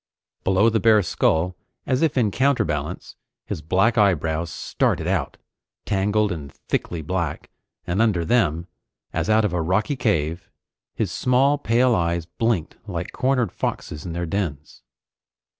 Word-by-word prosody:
Below 95 +4 +3
the 110 - +2
bare 110 -2 +5
skull, 85 +1 +1 0.3
as 130 0 0
if 160 -4 +1
in 110 -5 +3
counterbalance, 95 - -1 0.3
his - - -5
black 95 +9 +2
eyebrows 85 -4 +2
started 75 - -1
out, - - -1 0.5
tangled 105 +1 +1
and 75 -5 -6
thickly 80 +3 -3
black, 85 -1 -3 0.3
and 90 +5 0
under 100 -7 +2
them, 85 -7 +1 0.5
as - - -1
out 110 0 +4
of 100 - -1
a 85 - 0
rocky 95 - 0
cave, 85 - -1 0.5
his - - -1
small 135 +3 +2
pale 125 -1 +3
eyes 85 -3 0
blinked 90 -1 -1
like 90 -2 -4
cornered 130 -6 +1
foxes 75 - -4
in 85 - -5
their 85 +1 -2
dens. 80 -5 -4
95 Hz, 140 wpm, -23 LUFS, 85-115 Hz, 0.5 s, bare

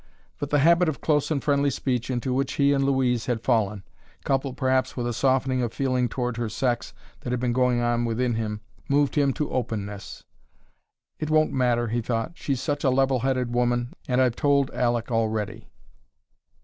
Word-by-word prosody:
But 145 - -3
the 145 - +3
habit 170 +4 +4
of 155 - -4
close 150 -2 +1
and 150 -4 -1
friendly 140 -1 +2
speech 125 -3 -2
into 125 0 -1
which 135 +1 0
he 140 0 +3
and 135 -1 +1
Louise 130 -3 +1
had 120 -2 -1
fallen, 105 -5 +1 0.4
coupled 135 -1 -1
perhaps 130 -1 +1
with 120 - -2
a 120 - -1
softening 130 +1 +1
of 120 -2 -1
feeling 130 -2 0
toward 125 -1 -3
her 120 -2 -2
sex 120 +2 -2 0.2
that - - -6
had 125 0 -1
been 125 -1 0
going 125 -1 +2
on 120 0 +1
within 120 +1 0
him, 105 -2 -3 0.3
moved 140 0 +2
him 140 -2 +2
to 150 +1 -3
openness. 105 -5 -4 1.0
"It 155 - -3
won't 155 0 +3
matter," 120 -3 +1
he 120 +2 0
thought. 115 -1 -2
"She's 140 -6 -3
such 145 0 -2
a 135 - +4
level 135 0 +2
headed 130 -1 -1
woman; 120 0 0
and 125 0 +1
I've 125 -3 +3
told 140 -2 +2
Aleck 120 -1 0
already." 110 -2 -2
125 Hz, 190 wpm, -25 LUFS, 120-135 Hz, 1.0 s, habit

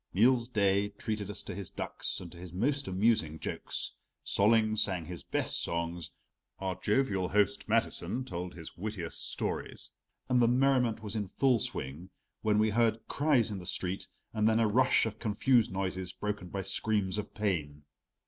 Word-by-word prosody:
Niels 120 +3 +4
Daae 100 -3 +2
treated 105 -2 -3
us 105 - -5
to - - -6
his 100 -3 -5
ducks - - -2
and 85 -2 -9
to 85 - -12
his 90 -1 -8
most 140 - 0
amusing 95 -5 +2
jokes, - - -3 0.3
Solling 110 +1 +4
sang 95 -5 0
his 90 0 -5
best - - 0
songs, 85 0 -2 0.5
our 95 -1 -2
jovial 100 -1 +1
host 100 0 +2
Mathiesen 125 +1 0
told 90 -4 -5
his 80 -2 -9
wittiest 95 -3 -5
stories, - - -4 0.4
and 125 -1 +3
the 120 - +5
merriment 125 -3 +3
was 105 +1 -3
in 105 -2 -1
full 130 +4 +2
swing 75 +1 -4 0.3
when 105 -1 +2
we 110 0 +3
heard 115 0 +1
cries 140 -7 +2
in 100 - -4
the 90 - -9
street, 90 +1 -1 0.3
and 110 0 +3
then 110 0 +3
a 115 - +4
rush 125 +4 +4
of 110 -1 -4
confused 115 +1 +3
noises 95 -1 -3
broken 105 -2 -3
by 95 +2 -4
screams 100 0 0
of 105 - -7
pain. 75 -9 -1
105 Hz, 170 wpm, -31 LUFS, 90-115 Hz, 0.5 s, the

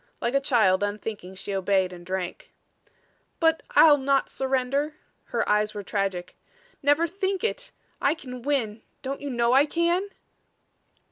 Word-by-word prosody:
Like 235 - -1
a 275 - +3
child, 215 -8 +3
unthinking, 205 -2 -4
she 200 +1 -6
obeyed 190 -1 +1
and 175 -1 -10
drank. 190 - -5 0.9
"But 325 -1 +3
I'll 295 -3 +8
not 275 0 +1
surrender." 270 +3 -1 0.3
Her - - -1
eyes 210 0 +1
were 205 - -4
tragic. 190 -3 -2 0.5
"Never 290 +3 +3
think 380 +2 -2
it! - - -2 0.3
I 280 +3 +3
can 250 -5 -9
win 235 -6 -1 0.2
don't 275 +1 -4
you 285 - -4
know 235 -1 +2
I 275 +3 +5
can?" 340 +5 +1
255 Hz, 145 wpm, -26 LUFS, 205-295 Hz, 0.9 s, I'll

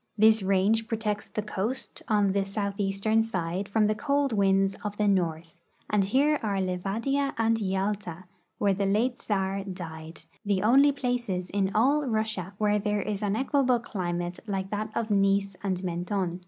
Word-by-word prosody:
This 220 +1 +5
range 200 +4 +2
protects 215 -2 -2
the 215 - -3
coast 210 +5 -4
on 205 -2 +3
the 195 0 +1
southeastern 200 +2 0
side 190 -3 -2
from 215 +1 +3
the 215 - +2
cold 280 +4 0
winds 195 -1 +3
of 205 -1 -4
the 210 - +2
north, 170 -3 -1 0.3
and 210 -2 +3
here 280 +9 +2
are 205 -3 -1
Livadia 210 +10 -1
and 225 0 +2
Yalta, 190 -2 -2 0.3
where 200 -1 +2
the 195 +1 0
late 230 +6 +1
Czar 195 -1 -1
died 165 -4 -7
— - - -34
the 200 -2 0
only 275 +6 +6
places 240 -9 -2
in 195 -1 +1
all 280 +7 +3
Russia 215 -5 -1
Avhere 210 -1 +2
there 210 -1 0
is 210 -1 -3
an 205 -1 0
equable 265 -1 +2
climate 175 -5 -3
like 195 -1 -3
that 215 +1 -2
of 225 -2 -1
Nice 195 -1 +2
and 190 -2 -2
Mentone. 180 0 -2
205 Hz, 170 wpm, -27 LUFS, 190-220 Hz, 0.3 s, only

